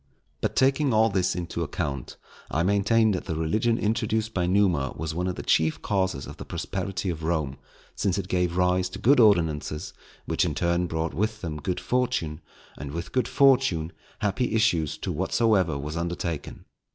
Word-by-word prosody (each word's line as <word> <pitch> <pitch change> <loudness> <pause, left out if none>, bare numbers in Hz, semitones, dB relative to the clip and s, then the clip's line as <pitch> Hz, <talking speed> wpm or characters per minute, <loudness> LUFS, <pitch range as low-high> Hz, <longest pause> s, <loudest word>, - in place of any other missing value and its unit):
But - - -1
taking 135 -1 +3
all 110 0 +4
this 95 -2 +1
into 85 -1 -4
account, 70 -4 -4 0.3
I 80 - 0
maintain 100 +3 +3
that 90 - -2
the 80 - -3
religion 110 +9 +1
introduced 110 0 0
by 90 -4 0
Numa 90 -8 +2
was 80 0 -3
one 90 +2 -1
of 90 - -2
the - - -6
chief 80 0 +2
causes 95 -8 0
of - - -10
the - - -7
prosperity 95 -1 -3
of 80 -2 -6
Rome, 80 -5 -1 0.4
since 95 -2 0
it 100 - -3
gave 90 -1 0
rise 90 0 +2
to 95 - -7
good 130 +7 +4
ordinances, 80 -8 +2 0.3
which - - +1
in - - -1
turn 85 0 +1
brought 80 -1 -2
with 110 +6 -1
them 75 -4 -5
good 90 +4 -2
fortune, 95 -7 -1 0.4
and 70 0 -6
with 85 +3 -5
good 130 - +1
fortune, 125 - +3 0.3
happy 115 +3 0
issues 85 -9 +2
to - - -4
whatsoever 95 -10 +1
was 75 +3 -5
undertaken. 85 -2 -4
90 Hz, 175 wpm, -26 LUFS, 80-110 Hz, 0.4 s, all